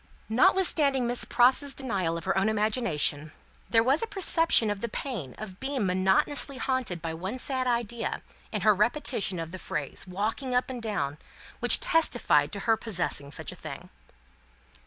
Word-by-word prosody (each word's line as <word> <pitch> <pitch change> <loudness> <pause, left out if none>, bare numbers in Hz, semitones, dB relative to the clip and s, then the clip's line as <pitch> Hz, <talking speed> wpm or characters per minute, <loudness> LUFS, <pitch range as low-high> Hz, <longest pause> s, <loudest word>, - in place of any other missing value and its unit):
Notwithstanding 285 -2 +3
Miss 240 +1 +1
Pross's 260 +3 +3
denial 190 -11 -1
of 170 - -7
her 190 - 0
own 195 +3 +2
imagination, 205 - 0 0.4
there 225 -1 +4
was 270 +6 +2
a 455 - -2
perception 330 - +3
of 205 - -4
the 235 - -3
pain 205 - -5
of 195 -3 -9
being 265 -5 -2
monotonously 190 +10 +2
haunted 250 - -2
by 165 -1 -3
one 190 +9 -5
sad 260 0 -2
idea, 235 -1 -2 0.3
in - - -2
her 215 - +5
repetition 210 -2 0
of 165 -1 -5
the 185 - -7
phrase, 150 +2 -3
walking 220 +8 -2
up 250 +1 +1
and 245 -2 -6
down, 155 -10 -3 0.4
which - - +4
testified 340 -10 +2
to 200 - -4
her 225 +2 +3
possessing 180 -10 -2
such - - -5
a - - -10
thing. - - -9
225 Hz, 165 wpm, -27 LUFS, 185-260 Hz, 0.4 s, her